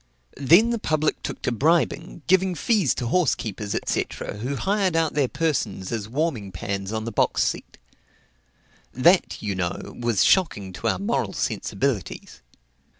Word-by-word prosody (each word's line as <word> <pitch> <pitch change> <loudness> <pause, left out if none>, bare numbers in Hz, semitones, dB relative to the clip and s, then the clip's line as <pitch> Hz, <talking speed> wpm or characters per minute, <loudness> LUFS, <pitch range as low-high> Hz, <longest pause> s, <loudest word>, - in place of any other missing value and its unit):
Then 170 - +5
the 235 - -1
public 155 -5 0
took - - -6
to - - 0
bribing, 160 +4 0
giving 190 0 +3
fees 195 - +2
to 125 - -3
horse 160 +4 +2
keepers, 105 -1 -5
&c., - - 0 0.3
who 130 +6 -3
hired 195 +2 0
out 165 -1 +1
their 145 -3 +2
persons 120 - -2
as 110 -2 -3
warming 125 -7 -2
pans 100 +1 -4
on 110 0 -3
the 115 - -3
box - - +2
seat. - - -3 1.1
That, 170 +5 +3
you 105 -2 -1
know, 90 -2 -4
was 120 -4 +2
shocking 105 - +2
to - - -4
our - - +1
moral - - -1
sensibilities. 110 -2 -3
135 Hz, 150 wpm, -24 LUFS, 105-170 Hz, 1.1 s, Then